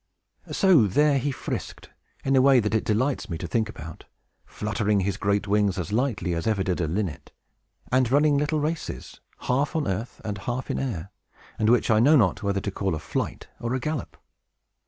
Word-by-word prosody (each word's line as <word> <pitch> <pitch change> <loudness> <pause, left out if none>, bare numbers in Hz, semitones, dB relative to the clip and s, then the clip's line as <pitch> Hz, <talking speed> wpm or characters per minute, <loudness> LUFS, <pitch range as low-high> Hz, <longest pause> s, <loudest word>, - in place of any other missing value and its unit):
So 175 - +5
there 145 +7 +3
he 145 - -1
frisked, 130 - -6 0.3
in 135 0 +2
a 130 - +6
way 135 -1 +6
that 105 -1 -1
it 110 - +2
delights 125 +6 0
me 85 - -3
to - - -6
think 115 -3 0
about, 80 +1 -9 0.4
fluttering 105 -1 0
his 95 0 -1
great 100 +1 0
wings 100 -2 +2
as 90 +1 -4
lightly 115 -7 0
as 85 +3 -2
ever 105 -3 +1
did 90 -1 -1
a 80 - 0
linnet, 90 0 -3 0.6
and 130 -1 +3
running 145 +2 +4
little 150 +2 +1
races, 155 +2 -4 0.2
half 140 +4 0
on 160 - 0
earth 100 +5 -3
and 105 -2 -3
half 120 +6 -3
in - - -2
air, 100 -8 -4 0.5
and 110 - +3
which 120 -1 +3
I 110 - +5
know 145 +7 +6
not 105 -10 +3
whether 100 -1 -1
to 100 - -3
call 95 -3 -1
a - - -4
flight - - -4
or 120 +2 -2
a - - -1
gallop. 155 +1 -4
110 Hz, 200 wpm, -25 LUFS, 100-135 Hz, 0.6 s, a